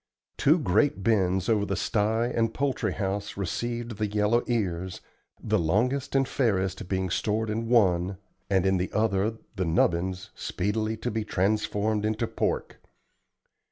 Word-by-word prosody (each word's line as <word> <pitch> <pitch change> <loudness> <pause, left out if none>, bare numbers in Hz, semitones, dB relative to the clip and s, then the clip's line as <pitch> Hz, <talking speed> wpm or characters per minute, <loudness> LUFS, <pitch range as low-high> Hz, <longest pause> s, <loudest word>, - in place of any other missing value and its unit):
Two 155 +5 +4
great 110 - +1
bins 95 -3 +2
over 110 -3 +2
the 100 -1 -1
sty 110 +3 +1
and 115 -2 0
poultry 130 -7 0
house 100 +1 -3
received 115 +4 -3
the 105 0 0
yellow 105 +3 +2
ears, 95 -6 -1 0.4
the - - 0
longest 125 - 0
and 135 -1 +3
fairest 95 -7 0
being 95 -2 -1
stored 110 +3 0
in 115 +1 -2
one, 95 -5 +3 0.3
and 95 -2 +2
in 95 0 +3
the 90 +1 -2
other 105 +1 +1 0.2
the 95 - +1
"nubbin's," 90 +3 0
speedily 110 +3 -2
to - - -3
be 110 0 -1
transformed 105 +1 0
into 110 +2 0
pork. - - -2
105 Hz, 145 wpm, -27 LUFS, 95-115 Hz, 0.4 s, Two